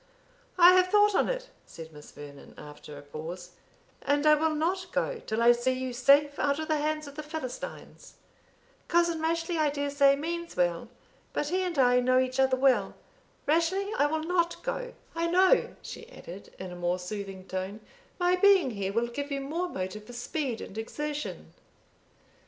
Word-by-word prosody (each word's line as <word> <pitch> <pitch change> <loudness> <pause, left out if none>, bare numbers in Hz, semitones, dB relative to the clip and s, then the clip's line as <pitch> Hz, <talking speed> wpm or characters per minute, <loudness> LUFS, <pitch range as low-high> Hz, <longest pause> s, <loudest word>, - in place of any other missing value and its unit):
"I 355 0 +9
have 365 0 +5
thought 415 +2 +4
on - - +2
it," - - -4 0.2
said 160 -1 -11
Miss 150 0 -13
Vernon 145 -1 -12
after 150 0 -11
a 145 - -11
pause, 165 +5 -8 0.5
"and 285 +1 +1
I 305 - +7
will 310 +1 +2
not 360 +4 -1
go - - -1
till 220 +2 0
I 240 - +8
see 240 +2 +1
you 255 -1 -4
safe 285 +3 +4
out 280 -1 +1
of 315 0 -4
the 310 - +2
hands 305 +1 -1
of 285 - -10
the 305 - -6
Philistines. 300 -4 -8 0.7
Cousin 340 -1 +2
Rashleigh, 330 +1 -1
I 305 -1 +3
dare 285 0 -2
say, 280 -1 +5
means 335 +3 -5
well; 175 +5 0 0.4
but 295 - -1
he 370 +3 0
and 360 -4 -3
I 250 -2 +5
know 255 +1 +3
each 255 0 0
other 265 -1 +3
well. 255 -7 +2 0.5
Rashleigh, 355 +7 +1
I 290 - +3
will 315 +1 -2
not 345 0 0
go; - - -4 0.2
I 335 0 -1
know," 370 +7 +3
she 460 - -9
added, 190 - -11
in 185 -1 -7
a - - -8
more 175 0 -1
soothing 190 0 -7
tone, 190 +3 -4 0.4
"my 355 0 +3
being 380 -7 +5
here 200 -3 -3
will 230 +2 +1
give 280 +5 -5
you 280 -1 -2
more 330 +6 -3
motive 190 - -5
for 245 - -11
speed 245 0 -3
and 210 - -7
exertion." 295 +6 -5
285 Hz, 185 wpm, -28 LUFS, 220-335 Hz, 0.7 s, I